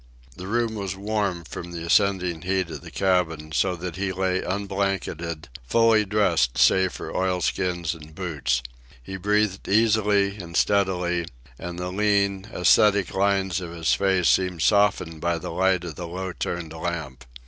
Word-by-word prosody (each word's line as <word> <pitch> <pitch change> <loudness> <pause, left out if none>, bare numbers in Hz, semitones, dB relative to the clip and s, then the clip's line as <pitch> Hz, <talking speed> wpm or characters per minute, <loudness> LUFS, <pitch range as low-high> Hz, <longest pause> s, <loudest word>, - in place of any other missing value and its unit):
The 90 - -8
room 115 +1 0
was 100 -3 -4
warm 100 -3 -2
from 85 +1 -8
the 85 -1 -5
ascending 90 -3 +2
heat 95 -2 -1
of 75 -3 -7
the - - -10
cabin, 80 -5 0
so 90 +4 +1
that 90 +1 -6
he 100 0 -1
lay 95 0 0
unblanketed, 95 -4 -3 0.2
fully 115 - +4
dressed 90 - +1
save 95 -1 +4
for - - -7
oilskins 90 -2 0
and 80 -1 -13
boots. 70 -9 -1 0.4
He 95 - -7
breathed 105 0 0
easily 105 -2 +2
and 85 -3 -5
steadily, 90 -4 +1 0.3
and 90 0 -6
the 90 +1 -4
lean, 100 0 +1
ascetic 100 0 +3
lines 95 -1 +1
of 85 -2 -7
his 80 -1 +1
face 95 -3 +2
seemed 90 -3 +2
softened 100 -6 +2
by 85 0 0
the 80 - -6
light 95 +1 +1
of 85 -2 -6
the 85 - -5
low 95 +2 -5
turned 85 -2 -4
lamp. 80 -6 -5
95 Hz, 160 wpm, -24 LUFS, 85-100 Hz, 0.4 s, fully